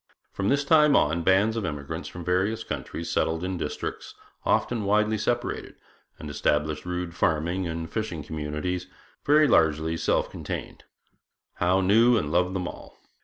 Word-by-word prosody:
From 100 +1 -1
this 140 +1 +2
time 150 -1 +5
on, 80 +3 +2
bands 95 +6 +3
of 115 - -2
emigrants 80 0 -5
from 85 -1 -9
various 95 +6 0
countries 85 - -5
settled 80 +1 0
in 95 0 -2
districts 75 - -5 0.3
often 115 -3 +1
widely 105 +2 +2
separated, 120 +3 -2 0.4
and 75 - -8
established 75 +2 -1
rude 90 -1 -3
farming 85 +3 0
and 80 0 -4
fishing 100 -8 -4
communities, 80 +5 -4 0.4
very 150 +1 +5
largely 80 - +3
self - - 0
contained. - - -6 0.7
Howe 90 +2 +2
knew 115 +6 +5
and 75 -8 -2
loved 90 +2 +1
them 90 -2 -2
all. - - -10
90 Hz, 150 wpm, -26 LUFS, 80-105 Hz, 0.7 s, time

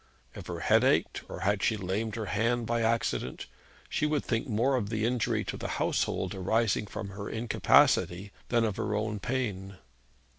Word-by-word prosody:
If - - -9
her - - -5
head - - +4
ached, - - +2
or - - -7
had 100 0 +1
she 110 - +2
lamed 100 +3 -2
her 110 -2 -3
hand 115 +4 0
by 120 +1 0
any 115 - +2
accident, 115 - -1 0.4
she 150 - 0
would 150 -2 0
think 115 +4 -1
more 125 +4 +2
of 105 -5 -1
the 110 -1 -1
injury 120 -1 0
to - - -5
the - - -4
household - - 0
arising 105 +3 +1
from 100 - -6
her 100 +1 -6
incapacity 105 -4 +3 0.2
than 120 -1 +3
of 105 -3 -2
her 105 0 -1
own 105 0 -2
pain. 100 -6 -3
110 Hz, 185 wpm, -29 LUFS, 100-115 Hz, 0.4 s, head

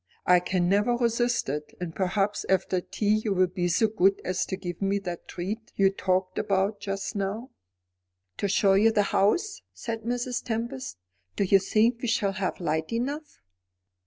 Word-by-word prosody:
"I 180 0 +6
can 180 0 0
never 205 +6 +3
resist 240 0 +1
it. 150 +2 -4
And 175 -2 -5
perhaps 195 +2 0
after 185 -1 +1
tea 215 +3 0
you 205 -3 0
will 185 0 +4
be 180 0 -2
so 180 +6 +3
good 195 -2 +2
as 185 0 -1
to 190 - -3
give 175 -2 -6
me 195 +1 +1
the 180 -4 -4
treat 205 +5 -5
you 195 -1 +4
talked 185 -1 -1
about 200 0 0
just 195 +2 -4
now." 205 +6 -3 0.9
"To 200 - 0
show 195 0 +3
you 215 +4 +5
the 210 -2 +3
house?" 370 - +2
said 225 -2 -4
Mrs. 245 +2 -2
Tempest. 225 - -4 0.4
"Do - - +1
you 195 +1 +5
think 225 +5 +2
we 245 - -2
shall 205 -3 +1
have 190 -1 -2
light 160 -2 -1
enough?" 285 +6 -3
195 Hz, 175 wpm, -27 LUFS, 185-225 Hz, 0.9 s, I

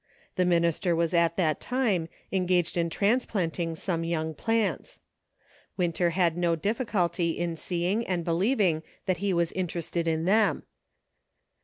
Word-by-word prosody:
The 180 - +2
minister 170 0 +2
was 170 +1 0
at 170 -1 +2
that 160 -5 +1
time 215 -11 0 0.2
engaged 180 -2 +1
in 170 -1 +1
transplanting 180 -5 0
some 165 0 -2
young 160 -1 -2
plants. 225 +6 -1 0.8
Winter 175 -1 +1
had 170 -1 +1
no 175 -1 +1
difficulty 175 -4 0
in 170 -1 -2
seeing 180 +7 -1
and 175 -3 -1
believing 180 -1 +2 0.2
that 185 -2 0
he 200 +2 -1
was 170 -2 +1
interested 170 -2 -3
in 160 0 0
them. 215 +3 +3
175 Hz, 135 wpm, -27 LUFS, 165-190 Hz, 0.8 s, them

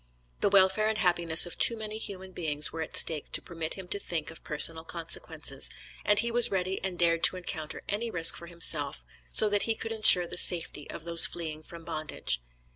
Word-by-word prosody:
The - - 0
welfare 195 +2 +2
and 220 - -3
happiness 170 -3 +2
of 175 - -9
too 230 - +3
many 215 0 -8
human 190 -3 -6
beings 150 -4 -1
were 165 - -6
at 160 - -7
stake 155 -3 0
to - - +2
permit 165 -2 -7
him 190 -2 -11
to 200 - -3
think 165 -5 -5
of 160 - -13
personal 160 +2 +3
consequences, 165 0 -2 0.3
and 210 - +1
he 235 +2 0
was 240 0 +5
ready 190 0 -4
and 190 -2 -5
dared 170 -1 0
to - - 0
encounter 160 -3 -7
any 220 +3 -4
risk 165 -5 +3
for 170 - -11
himself, 160 -4 +2 0.3
so 215 - +6
that 205 -1 -1
he 225 - +1
could 225 - -8
insure 215 -5 +5
the 170 - -7
safety 165 -4 0
of - - -9
those 170 0 +7
fleeing 160 -3 -8
from 165 +1 -14
bondage. 155 - -4
175 Hz, 205 wpm, -27 LUFS, 160-200 Hz, 0.3 s, those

